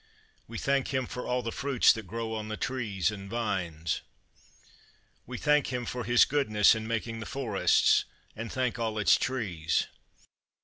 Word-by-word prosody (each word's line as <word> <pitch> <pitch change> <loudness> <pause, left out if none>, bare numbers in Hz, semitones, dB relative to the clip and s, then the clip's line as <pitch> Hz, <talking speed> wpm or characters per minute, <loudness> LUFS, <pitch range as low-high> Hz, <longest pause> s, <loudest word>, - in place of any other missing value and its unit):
We 115 - -7
thank 135 +1 +1
Him 130 -2 0
for 125 - -6
all 125 0 0
the 115 - -3
fruits 135 -1 +3
that 110 -4 -8
grow 115 +2 -4
on 110 -1 -4
the 110 0 -4
trees 105 -8 -1
and 100 -2 -8
vines. 90 -8 -2 1.3
We 125 +1 -5
thank 150 0 +2
Him 125 -1 -3
for 125 0 -4
his 120 +1 +5
goodness 110 -8 +4
in 110 0 -4
making 115 0 -3
the 110 - -6
forests, 120 -7 +2 0.3
and 115 +1 -6
thank 125 -2 -1
all 110 -2 -2
its 105 - +5
trees. 90 - -1
115 Hz, 165 wpm, -29 LUFS, 105-125 Hz, 1.3 s, his